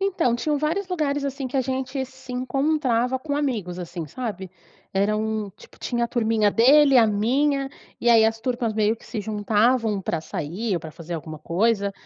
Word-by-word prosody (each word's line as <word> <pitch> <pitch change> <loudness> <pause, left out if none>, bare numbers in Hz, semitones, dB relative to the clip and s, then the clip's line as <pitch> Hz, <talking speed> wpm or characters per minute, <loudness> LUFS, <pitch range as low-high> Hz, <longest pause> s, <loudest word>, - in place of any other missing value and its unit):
Então, 365 -11 +1
tinham 295 +5 0
vários 335 +6 -1
lugares, 290 -5 -1
assim, 275 -1 -3
que 260 - -4
a - - +4
gente 265 +1 -2
se 260 0 -12
encontrava 260 -1 0
com 285 +1 -3
amigos, 220 -12 -2
assim, 170 -2 -6
sabe. 195 - -5 0.4
Eram, 215 +1 0
tipo, - - -17
tinha 240 -1 -1
a - - -3
turminha 220 -3 +2
dele 275 +4 +6
a 230 - +6
minha, 270 +7 +1 0.3
e 240 - +1
aí 225 -1 +6
as 225 0 +1
turmas 240 -2 -1
meio 215 +1 +2
que - - -18
se 220 - -4
juntavam 215 +1 +1
pra 170 -3 -2
sair 180 +7 -3
ou 170 - -1
pra 160 - -8
fazer 170 +2 -7
alguma 155 -1 -6
coisa. 200 +5 0
235 Hz, 185 wpm, -24 LUFS, 205-265 Hz, 0.4 s, dele